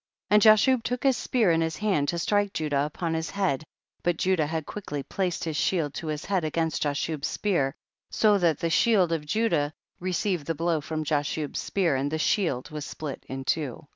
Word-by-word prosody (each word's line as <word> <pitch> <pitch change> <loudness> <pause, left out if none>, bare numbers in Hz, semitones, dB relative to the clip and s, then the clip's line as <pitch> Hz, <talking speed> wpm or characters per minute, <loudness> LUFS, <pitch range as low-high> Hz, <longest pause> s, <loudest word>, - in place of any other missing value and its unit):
38. - - +6
And 210 - +6
Jashub 225 +4 +6
took 245 +2 -2
his 270 -2 +4
spear 225 -4 +2
in 165 0 +2
his 160 -1 -1
hand 195 -9 +1
to 170 - -1
strike 205 +3 +1
Judah 145 -2 0
upon 165 +2 -3
his 160 0 -2
head, 185 -8 0 0.4
but 175 -2 0
Judah 180 -5 +1
had 160 0 -3
quickly 150 -9 -5
placed 180 +1 -2
his 160 -2 -3
shield 155 -3 0
to 160 - -5
his 155 -1 -3
head 190 -3 0
against 160 +1 -1
Ja 145 - +1
shub's 150 0 -2
spear, 165 -10 0 0.3
so 210 -2 +3
that 165 -5 +2
the 165 - -1
shield 195 -2 +4
of 155 -3 -2
Judah 150 -7 +1 0.3
received 180 -3 -1
the 165 - -1
blow 165 0 0
from 155 +1 -3
Ja 145 -1 +2
shub's 145 0 -3
spear, 180 -7 0
and 135 +2 0
the 160 - -2
shield 160 -5 0
was 150 -1 -5
split 145 -1 -6
in 135 0 -5
two, 145 -5 0
39. 145 - -15
165 Hz, 215 wpm, -27 LUFS, 150-195 Hz, 0.4 s, 38